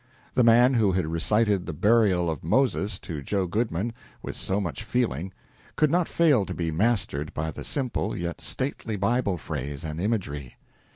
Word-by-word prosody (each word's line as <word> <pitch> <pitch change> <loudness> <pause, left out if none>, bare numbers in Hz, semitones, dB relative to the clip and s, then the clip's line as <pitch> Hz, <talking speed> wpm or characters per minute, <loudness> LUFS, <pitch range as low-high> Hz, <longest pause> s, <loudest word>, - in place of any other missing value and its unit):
The 125 - +4
man 120 +3 +6
who 110 -6 +3
had 90 -2 +1
recited 100 +4 +1
"The 80 - -3
Burial 100 0 +3
of 80 -4 -3
Moses" 105 - +1
to 80 -5 -5
Joe 95 +6 -1
Goodman, 110 +2 -1 0.3
with - - -5
so 95 +2 -1
much 95 +1 -4
feeling, 110 - -1 0.4
could 155 -2 +3
not 175 -1 +2
fail 150 -10 +4
to - - -4
be 85 -2 -1
mastered 95 -6 0
by 80 0 -2
the - - -8
simple 120 -6 -2
yet 85 -1 -4
stately 130 -4 -3
Bible 100 -1 +1
phrase 70 -2 -5
and 80 +1 -4
imagery. 80 - -2
100 Hz, 170 wpm, -26 LUFS, 85-115 Hz, 0.4 s, man